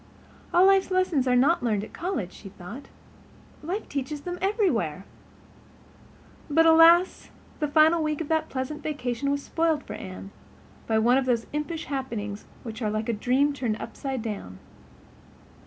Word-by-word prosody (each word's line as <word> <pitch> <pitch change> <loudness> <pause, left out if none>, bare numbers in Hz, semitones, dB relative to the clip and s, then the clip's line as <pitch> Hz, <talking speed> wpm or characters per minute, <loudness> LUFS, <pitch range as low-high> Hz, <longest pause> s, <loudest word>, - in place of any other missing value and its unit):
"All 355 +2 +5
life 390 -1 +4
lessons 370 -8 +1
are 250 - +3
not 285 +7 +3
learned 215 -4 0
at - - -10
college," 315 - -3
she 195 - -11
thought. 200 +8 -10 0.7
"Life 370 +8 -4
teaches 285 +1 -4
them 355 +3 -5
everywhere." 260 - 0 1.4
But 325 +3 +4
alas, 330 +3 +5 0.3
the 300 - 0
final 315 +3 +4
week 305 -1 -1
of 325 - -4
that 315 -1 0
pleasant 265 +3 -4
vacation 280 -3 -2
was 285 0 -1
spoiled 325 -2 0
for - - -8
Anne, 190 +1 -8 0.6
by 220 - +2
one 240 +4 +4
of 270 - -2
those 235 -2 +1
impish 305 +2 -3
happenings 225 -7 -4 0.2
which 225 0 -7
are 215 - 0
like 215 +2 -2
a - - +1
dream 260 +7 +1
turned 240 -6 -2
upside 260 +1 -5
down. 200 - -6
280 Hz, 155 wpm, -26 LUFS, 225-325 Hz, 1.4 s, All